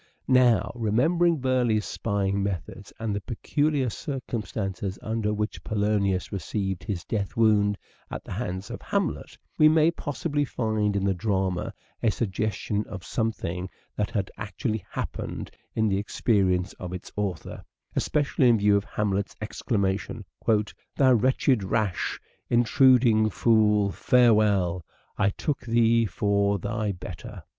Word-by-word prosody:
Now, 125 -3 +4
remembering 155 +10 +2
Burleigh's 125 -5 +1
spying 100 -2 -1
methods 95 -5 -4
and 110 -2 -2
the 100 - -2
peculiar 135 +3 0
circumstances 105 - -4
under 110 -1 -1
which 105 0 -3
Polonius 100 -3 0
received 95 0 -3
his 95 -6 -4
death 100 -2 -3
wound 105 -3 +3 0.3
at - - -6
the - - -11
hands 95 +2 -4
of - - -6
Hamlet, - - -2 0.2
we 155 - +8
may 160 +1 +4
possibly 145 -1 -2
find 110 -6 -1
in 100 - 0
the 100 0 +2
drama 95 -1 -1 0.3
a 115 - +3
suggestion 105 0 -1
of 95 -3 -7
some 115 -1 0
thing 90 -2 -5 0.3
that 105 - -1
had 100 -5 -2
actually 110 0 -3
happened - - -5 0.2
in 110 0 +2
the 95 -1 +1
experience 95 -3 +1
of 90 -1 -6
its 90 - -7
author; 100 -5 -4 0.3
especially 140 -3 +2
in 115 - +5
view 105 0 +4
of 100 0 +1
Hamlet's 100 -1 -2
exclama 100 -3 -1
tion: 105 - -8 0.4
' 105 - -14
Thou 130 -2 +5
wretched, 130 -1 +2
rash, 100 -1 -1 0.3
intruding 120 -2 +4
fool, 105 -2 +3
farewell! 105 -5 +3 0.2
/ 100 -1 -1
took 145 -3 -1
thee 115 -1 +3
for 100 +2 +1
thy 105 +2 -2
better." 90 -1 -8
105 Hz, 135 wpm, -26 LUFS, 100-120 Hz, 0.4 s, we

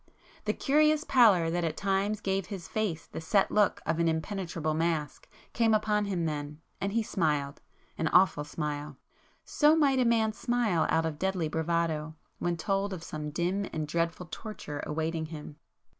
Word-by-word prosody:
The - - +1
curious 305 +2 +3
pallor 205 - +5
that 175 +1 0
at 160 -2 -2
times 200 +2 0
gave 195 -1 -1
his 190 -5 -7
face 200 -7 -2
the - - -7
set 195 +4 +2
look 210 -1 +2
of 160 +1 0
an 170 - +3
impenetrable 165 -1 -2
mask, 160 -2 -2 0.2
came 225 -2 +3
upon 210 -1 +1
him 185 -4 -1
then, 150 -1 -4 0.2
and 200 - -1
he 230 0 +2
smiled,—an 150 -2 -3
awful 180 -4 +4
smile. 150 -1 -4 0.5
So 300 +1 +4
might 280 -4 +3
a 250 - +3
man 225 -2 +2
smile 225 -8 +1
out 160 0 +2
of 155 -2 -3
deadly 190 -4 0
bravado, 160 -1 -1 0.2
when 175 -1 -1
told 195 +3 -1
of 170 -3 -7
some 150 -1 -5
dim 180 +6 -1
and 155 -1 -3
dreadful 170 +2 -1
torture 150 -9 -6
awaiting 160 +1 -2
him. 150 -2 -9
170 Hz, 165 wpm, -29 LUFS, 160-210 Hz, 0.5 s, pallor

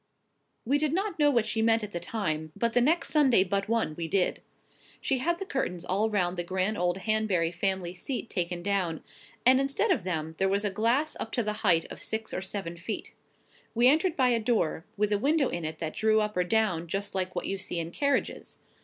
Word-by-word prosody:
We 280 +5 +2
did 305 0 0
not 390 -1 -1
know 295 -1 +5
what 235 -6 +2
she 220 - -1
meant 225 0 +3
at 210 - -5
the 175 - -3
time; 160 -9 -3
but 235 -1 0
the 245 - +4
next 320 +7 +2
Sunday 265 -10 +5
but 195 +2 -2
one 230 -9 +1
we 165 0 -3
did. 185 +2 +1 0.6
She 265 -2 0
had 340 +6 0
the 390 - -5
curtains 180 - -3
all 205 +4 +1
round 185 -4 0
the 175 - -1
grand 190 +4 -1
old 175 -1 0
Hanbury 195 -5 0
family 180 0 -1
seat 240 +6 -4
taken 175 -3 -2
down, 185 -5 -1 0.4
and, 260 +1 +7
instead 275 +10 +1
of 245 - +1
them, 160 -3 -3
there 195 0 +2
was 200 +2 0
glass 235 +9 +1
up 225 - -5
to 240 - +1
the 210 0 -1
height 170 -6 +4
of - - -9
six 220 0 -4
or - - -2
seven 190 -3 -5
feet. 205 +6 -5 0.6
We 240 +2 +5
entered 315 +5 +3
by 255 -2 +4
a 235 -1 +2
door, 215 -8 0
with 210 0 +1
a 205 - +2
window 285 +3 +2
in 170 -2 -4
it 155 0 -4
that 155 -1 -4
drew 220 0 +3
up 210 0 -1
or 180 0 +1
down 180 -5 +1
just 200 +4 -3
like 185 -1 -2
what - - -2
you 195 0 -2
see 175 - -4
in 165 0 -4
carriages. 280 +7 -1
210 Hz, 225 wpm, -28 LUFS, 180-245 Hz, 0.6 s, and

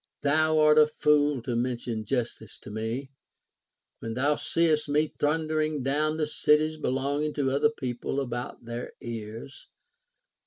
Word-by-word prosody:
Thou 155 +2 +3
art 155 0 +6
a 150 - +7
fool 150 -3 +2
to 120 0 -2
mention 120 -2 -2
justice 115 -3 -3
to - - -10
me, 115 +5 -4 0.9
when 115 0 -5
thou 145 +4 +2
seest 155 -2 +1
me 150 +1 +1
thundering 155 -1 0
down 155 +3 0
the 155 - +1
cities 155 +1 +2
be 155 - -3
longing 140 +3 -1
to 135 -3 0
other 140 +11 +3
people 130 - -3
about 120 -2 -5
their 120 +1 -6
ears. 115 +3 -8
140 Hz, 145 wpm, -27 LUFS, 120-155 Hz, 0.9 s, a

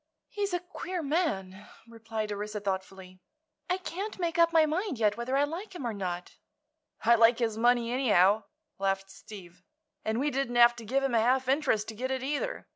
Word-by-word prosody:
"He's 405 -1 -2
a 355 - 0
queer 355 0 -6
man," 210 - -2 0.2
replied 225 -2 -5
Orissa, 210 +1 -4
thoughtfully. 190 -1 -5 0.5
"I 365 - +1
can't 380 +3 -5
make 340 -2 -2
up 335 0 +5
my 320 -1 +5
mind 330 - -2
yet 210 -2 +2
whether 240 +4 -1
I 280 - +4
like 350 +7 -5
him 280 - -5
or 235 - -2
not." 180 -3 -5 0.7
"I 235 - +6
like 230 0 +5
his 230 -3 -1
money, 240 +1 +2
anyhow," 210 -5 +3 0.3
laughed 195 0 -1
Steve; 185 -4 -12 0.4
"and 220 +2 -1
we 290 +2 0
didn't 270 -3 -2
have 240 0 +7
to 230 - -9
give 270 +5 0
him 270 -2 0
a 230 - +4
half 255 +2 +2
interest 265 -6 +1
to - - -6
get 255 +4 -3
it, 260 -1 -2
either. 295 - -3
235 Hz, 195 wpm, -29 LUFS, 210-295 Hz, 0.7 s, have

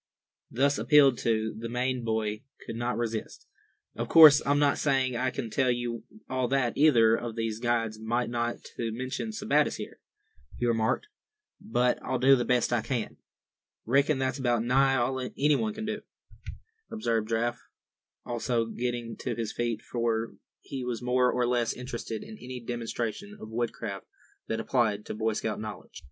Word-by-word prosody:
Thus 140 +3 +1
appealed 140 -4 +5
to, 110 -1 0
the 115 +1 -6
Maine 125 +1 -1
boy 110 -1 -1 0.2
could - - -6
not 120 +1 -2
resist. 115 -2 -4 0.5
"Of - - -4
course 155 -3 +9
I'm 145 +1 +3
not 145 -1 +3
saying 135 -3 +1
I 125 +2 +1
can 115 -3 -5
tell 130 +2 +2
you 120 -1 -2 0.2
all 130 -1 -1
that 130 -2 +1
either 120 -7 +5
of 115 -1 -5
these 115 -1 -2
guides 115 -2 0
might—not 120 +1 -1
to 115 -1 -2
mention 130 - -4
Sebattis 210 -9 +1
here," - - -8 0.6
he 120 - -1
remarked, 115 - +1 0.5
"but 125 - 0
I'll 130 +1 -1
do 135 +2 +6
the 120 -2 -1
best 125 -1 +2
I 120 - +2
can." 115 0 -3 0.7
"Reckon 140 +4 +3
that's 130 0 -1
about 120 -3 +1
nigh 135 +2 +3
all 130 +1 0
anybody 150 - 0
can 220 0 -5
do," 215 0 -3 0.9
observed 115 - -1
Giraffe, 120 +1 -1 0.6
also 120 -1 -1
getting 120 0 -3
to 120 -3 -3
his 115 -2 -3
feet; 120 -1 -2
for 115 -1 -1 0.3
he 135 -2 -6
was 125 -1 -4
more 125 0 +3
or 125 -1 +1
less 120 -2 +1
interested 120 -3 -6
in 110 - -11
any 125 0 -7
demonstration 120 - -4
of 110 - -9
woodcraft 110 -4 -4 0.4
that 110 - -2
applied 110 -3 0
to - - -5
Boy 110 +1 0
Scout 110 0 -2
knowledge. 110 -1 -8
120 Hz, 165 wpm, -28 LUFS, 115-130 Hz, 0.9 s, course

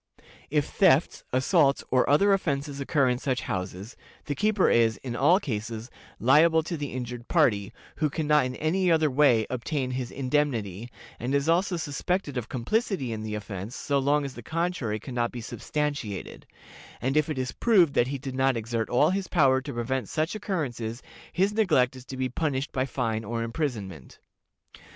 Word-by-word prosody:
If 150 -1 +1
thefts, 170 -6 +3
assaults, 140 +2 +3
or 130 -1 +3
other 200 +8 +5
offenses 140 -6 -1
occur 140 -1 +2
in 125 0 0
such 130 -2 -1
houses, 95 +4 -5 0.3
the 145 - -2
keeper 205 +6 +2
is, 115 -1 +3
in 125 -3 -4
all 165 +9 +4
cases, 115 - -5 0.3
liable 160 +6 +5
to 170 +2 -4
the 145 -3 -4
injured 125 -1 -6
party, 110 - +2 0.3
who 155 -2 +1
can 155 +2 -3
not 150 -3 +4
in 125 - -6
any 180 +6 +1
other 160 -3 +3
way 130 -5 +4
obtain 130 +1 -2
his 125 -1 -3
indemnity, 125 -7 -1 0.3
and 130 +4 -1
is 140 +1 +1
also 175 +2 +2
suspected 155 +1 -2
of 125 -2 -4
complicity 135 - -1
in 110 - -5
the 110 0 -4
offense 105 +1 -6
so 140 -1 0
long 145 +2 +2
as 135 - -6
the 120 - -9
contrary 160 -7 -2
can 125 - -8
not 120 -1 0
be 125 - -6
substantiated; 140 -3 -4 0.5
and 130 +4 -1
if 155 0 +2
it 155 - -3
is 130 -1 -2
proved 185 -11 +3
that 120 - +3
he 140 +1 -3
did 135 0 -6
not 130 -1 +2
exert 115 0 -2
all 150 +7 +3
his 190 -1 -2
power 135 -5 +3
to - - -6
prevent 120 0 -2
such 155 +2 -1
occurrences, 130 - -3 0.3
his 195 +4 +1
neglect 155 - +2
is 130 -1 -11
to 130 - -7
be 130 0 0
punished 135 +1 -2
by 130 0 -1
fine 115 -4 -2
or 115 +2 -3
imprisonment. 110 - -4
135 Hz, 185 wpm, -27 LUFS, 120-155 Hz, 0.5 s, other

